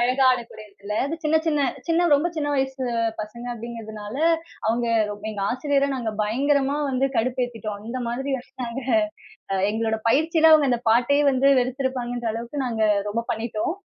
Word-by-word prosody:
அழகா 255 +3 +2
ஆடக்கூடிய 235 -3 -3
இடத்துல, 200 +1 -7
அது 320 +4 -3
சின்ன 305 +1 +3
சின்ன 295 -3 +2 0.2
சின்ன, 335 +1 +3
ரொம்ப 295 +5 +2
சின்ன, 295 -2 -1
வயசு 265 -1 -1 0.4
பசங்க 215 +3 -7
அப்படிங்குறதுனால 220 -2 -7 0.5
அவங்க 235 +2 +1 0.2
ரொம் 205 +1 -7
எங்க 205 -2 -4
ஆசிரியர 280 +2 +1
நாங்க 235 -3 -2
பயங்கரமா 275 +5 +1
வந்து 265 +1 +1
கடுப்பேத்திட்டோம். 230 -3 -2
அந்த 255 +2 -4
மாதிரி 265 +4 -3
வச்சுட்டாங்க 245 0 -6 0.7
அ 190 - +1
எங்களோட 220 +1 0
பயிற்சியில 320 +5 +4
அவங்க 300 -3 +6
அந்த 240 -1 +1
பாட்டையே 250 +6 +3
வந்து 265 0 +2
வெறுத்துருப்பாங்கன்ற 245 -2 -2
அளவுக்கு, 235 +5 -5
நாங்க 225 -3 -1 0.3
ரொம்ப 230 +3 -1
பண்ணிட்டோம். 220 +6 -2
245 Hz, 150 wpm, -24 LUFS, 225-275 Hz, 0.7 s, அவங்க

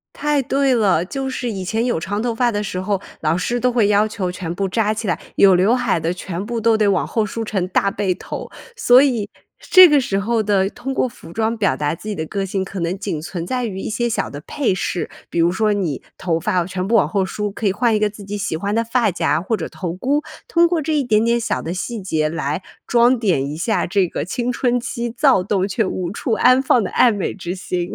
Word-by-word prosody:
太 295 -1 +1
对 270 +1 +1
了。 190 -7 +2
就 270 +7 -4
是 250 -2 -3
以 190 -2 -4
前 225 +5 -1
有 240 -10 0
长 205 +5 -3
头 240 -1 -1
发 240 +1 +1
的 205 0 -2
时 185 -2 -4
候， 195 0 -1 0.2
老 155 +2 +1
师 240 +7 -1
都 250 0 +2
会 230 -4 +3
要 210 +1 +3
求 190 -4 -3
全 175 -2 -5
部 195 +1 -2
扎 215 +1 +1
起 215 -1 -4
来， 175 - 0 0.2
有 195 -2 +6
刘 200 +7 +3
海 240 -9 0
的 165 +2 -1
全 185 +1 -5
部 230 0 -3
都 225 0 +3
得 210 -1 +2
往 190 -4 +1
后 220 -2 0
梳 225 +2 -4
成 195 -4 -2
大 200 -1 +1
背 195 -4 0
头。 - - -7 0.3
所 255 - +6
以 235 -7 +1 0.3
这 370 -1 +8
个 295 -1 +5
时 195 -6 -1
候 225 +1 0
的， 195 -2 +2
通 265 +4 -5
过 260 - +1
服 165 - -14
装 225 +1 -1
表 200 -3 +1
达 150 +2 -1
自 210 - -12
己 205 - -3
的 160 - -3
个 195 +4 -3
性 190 0 -2
可 190 0 -7
能 170 +3 -2
仅 170 -8 -3
存 170 0 -5
在 250 -2 -1
于 190 -3 -5
一 - - -4
些 240 +2 -1
小 - - -1
的 145 +1 -8
配 260 -10 0
饰。 180 - -2 0.2
比 170 - -2
如 170 +1 +4
说 215 +1 +1
你 175 -9 -2
头 165 -3 -1
发 180 +1 0
全 185 0 -4
部 230 - +2
往 185 -9 +4
后 190 +3 0
梳， 210 +2 -3
可 215 - -6
以 195 - +4
换 230 0 +2
一 - - +1
个 210 0 +2
自 205 0 -12
己 205 +1 -5
喜 200 -5 -2
欢 200 +4 -2
的 230 - +2
发 230 -2 +1
夹 160 -3 0
或 220 +4 -1
者 160 - -4
头 175 -3 -5
箍， 275 +10 0 0.3
通 340 0 +4
过 335 -2 0
这 315 +2 -1
一 285 - +2
点 220 -2 +2
点 235 0 +2
小 - - -2
的 165 - -4
细 225 +5 -4
节 155 -4 0
来 155 +1 -2 0.2
装 240 +1 +4
点 180 - +1
一 150 - -5
下 185 0 0
这 190 0 +2
个 - - -4
青 245 +5 -2
春 245 0 +1
期 240 -1 -4
躁 255 -3 +3
动 195 0 0
却 215 +3 0
无 180 -1 -3
处 225 +3 -2
安 255 +3 +5
放 245 -4 +3
的 - - -4
爱 245 - +5
美 200 -2 -2
之 180 -1 -5
心。 180 -1 -3
205 Hz, 275 characters per minute, -20 LUFS, 185-235 Hz, 0.3 s, 这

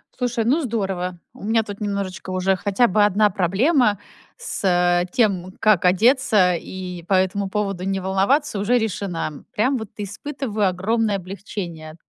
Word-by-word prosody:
Слушай, 245 -2 -1
ну 280 +8 +2
здорово! 190 - -3
У - - -13
меня 225 +2 +2
тут 205 -2 -8
немножечко, 200 -3 -4
уже 185 +1 +1
хотя 205 +5 +2
бы 205 +1 +3
1 210 +1 +3
проблема 205 - +2 0.4
с 175 - +1
тем, 185 -6 +1
как 210 -5 +3
одеться 210 -1 +4
и 180 0 -7
по - - 0
этому 190 +1 +1
поводу 195 -3 -2
не 195 0 -1
волноваться, 195 +9 +1
уже 225 +5 +2
решена. 185 -8 -3
Прям 255 +6 +2
вот 220 -4 -6
испытываю 215 +1 -3
огромное 210 +3 0
облегчение. 180 -4 -7
200 Hz, 145 wpm, -22 LUFS, 185-220 Hz, 0.4 s, одеться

